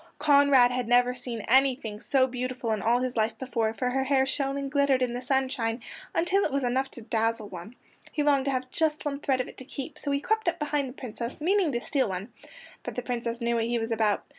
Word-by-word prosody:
Conrad 280 -4 +5
had 250 -2 -2
never 245 +1 +4
seen 245 -2 -5
anything 255 -4 +2
so 260 +3 +3
beautiful 255 -2 -3
in 215 -2 0
all 235 +4 +2
his 255 -1 -2
life 220 0 0
before, 235 -4 -1
for 250 +1 -1
her 265 +1 0
hair 265 -1 +3
shone 275 0 -1
and 275 -1 -4
glittered 280 -3 +3
in 245 -1 -1
the 245 - -4
sunshine 255 -3 0 0.4
until 370 +4 +2
it - - 0
was 275 0 0
enough 260 +2 0
to 235 - -11
dazzle 225 -1 -1
one. 180 +6 -9 0.4
He 300 - 0
longed 280 -2 +3
to 275 - +1
have 255 -1 -3
just 310 -2 0
one 280 -1 -2
thread 265 -3 +1
of - - -5
it - - -12
to - - -8
keep, 275 +2 -7
so 285 - -3
he 280 0 +1
crept 440 +6 -1
up 345 - +1
behind 295 -3 -1
the - - -9
Princess, 235 0 -6
meaning 360 +1 +2
to 240 - 0
steal 255 +1 0
one. 190 +5 -5 0.5
But - - -6
the 250 - -3
Princess 235 -1 -3
knew 235 0 +1
what 230 -1 +1
he 235 +1 0
was 225 0 -3
about. 215 -2 +1
255 Hz, 240 wpm, -27 LUFS, 235-280 Hz, 0.5 s, Conrad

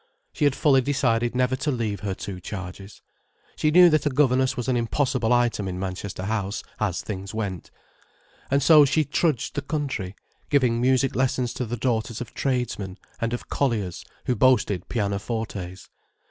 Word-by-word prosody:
She - - 0
had 140 -2 +3
fully 135 -3 +4
decided 120 -3 +1
never 125 +1 +2
to 150 +3 -2
leave 115 -7 -1
her 100 -1 -3
two 95 -1 -6
charges. 95 +1 -8 0.5
She 155 - +1
knew 180 +3 +8
that 155 -1 +2
a - - +3
governess 130 -2 +2
was 125 - -3
an 130 - +2
impossible 120 0 0
item 120 -5 +2
in 90 -1 -4
Manchester 95 0 -5
House, 100 0 -2 0.2
as 95 -5 -1
things 100 -1 -6
went. 100 -6 -4 0.8
And 140 0 +2
so 155 0 +8
she 150 +2 +2
trudged 145 -3 0
the 145 - -2
country, 140 - -3 0.3
giving 125 -5 +2
music 130 +1 +2
lessons 130 -1 0
to 125 - -3
the 120 +2 -3
daughters 115 -1 -1
of 125 -2 -7
tradesmen 120 -8 -2 0.2
and 115 0 -1
of 120 - -4
colliers 110 -10 -1 0.2
who 125 - +1
boasted 105 -6 +2
pianofortes. 100 -3 -3
120 Hz, 165 wpm, -25 LUFS, 100-130 Hz, 0.8 s, knew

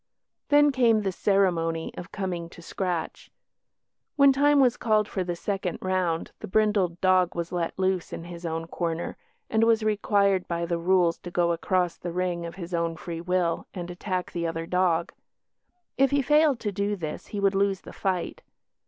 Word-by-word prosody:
Then 290 0 +6
came 230 -5 +3
the 195 - 0
ceremony 175 -5 +1
of 175 - -8
"coming 175 -3 -4
to 170 - -13
scratch". 180 -2 -4 0.9
When 280 -1 +6
time 290 +1 +4
was 250 -3 +4
called 215 -2 +1
for 190 - -2
the 175 -1 -3
second 190 -1 -3
round 185 -3 -1
the 215 - -7
brindled 200 -4 +1
dog 185 -2 +3
was 170 0 -3
let 175 -2 -2
loose 190 -2 0
in - - -6
his 170 0 -9
own 165 -1 -3
corner, 170 0 -3 0.3
and 220 0 +2
was 225 -1 +3
required 200 -3 +2
by 170 0 -2
the 170 0 -2
rules 175 -1 +2
to 175 - -8
go 175 -1 +1
across 175 +1 0
the 175 - -5
ring 175 -1 -2
of 170 - -9
his 180 -2 -8
own 170 -1 0
free 165 0 -6
will 180 -1 0
and 175 -1 -5
attack 185 0 -3
the 170 -1 -2
other 165 0 -3
dog. 175 -1 +1 0.9
If 270 0 +5
he 280 -1 +1
failed 295 -2 +4
to 210 - -2
do 200 +1 -1
this 160 -5 -6
he 205 - -5
would 200 0 +2
lose 195 -1 +1
the - - -11
fight. 185 -3 -2
185 Hz, 185 wpm, -26 LUFS, 170-205 Hz, 0.9 s, Then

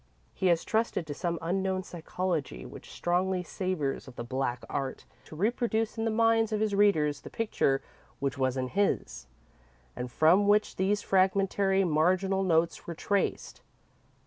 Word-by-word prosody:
He 190 - 0
has 170 -2 +3
trusted 220 -6 0
to 150 - -5
some 170 +2 -2
unknown 190 +2 -1
psychology 175 -3 -3
which - - -11
strongly 180 +1 0
savours 175 -7 -3
of 130 - -11
the 120 - -5
Black 125 0 -2
Art 135 -2 -4 0.2
to - - -11
reproduce 225 +3 0
in 225 -1 -2
the - - +2
minds 225 0 +3
of 215 - 0
his 215 -1 0
readers 160 -8 +3
the - - -9
picture 140 -11 0 0.3
which 140 -1 -2
was 130 -1 0
in 130 -1 -2
his, 200 +5 -1 0.7
and 125 0 -5
from 175 +9 +4
which 210 +1 +2
these 200 +2 +1
fragmentary, 195 0 +2
marginal 185 +4 +2
notes 170 -3 +1
were 170 - -5
traced. 200 +4 -1
185 Hz, 155 wpm, -29 LUFS, 155-200 Hz, 0.7 s, from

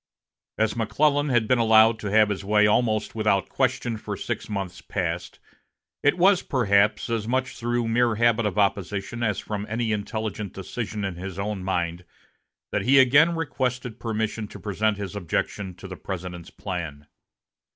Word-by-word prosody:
As 110 +1 +1
McClellan 145 +6 +2
had 120 -4 +2
been 125 +1 +3
allowed 110 0 +5
to 105 - -4
have 105 +1 +4
his 100 -1 -3
way 105 +1 +4
almost 110 0 +1
without 105 -4 +1
question 120 -2 0
for - - -5
six - - -4
months 100 -3 -4
past, - - -3 0.6
it 145 +4 +3
was, 185 +1 +5
perhaps, 105 -5 +2
as 115 -2 -2
much 130 +2 -1
through 120 0 -1
mere 115 0 +2
habit 115 0 +3
of 100 - -4
opposition 100 +2 -1
as 110 -4 0
from 105 -1 -4
any 115 0 -1
intelligent 105 -1 -3
decision 105 +2 -4
in 95 -3 -4
his 95 0 -6
own 100 -1 -3
mind 90 -2 -2 0.7
that - - 0
he 135 +3 +4
again 140 +6 +6
requested 125 -6 -2
permission 110 -1 -2
to - - -11
present 105 0 0
his 100 0 -6
objections 95 0 -3
to 95 - -9
the 95 -1 -8
President's 90 -2 -6
plan. 80 -6 -6
110 Hz, 160 wpm, -25 LUFS, 100-120 Hz, 0.7 s, again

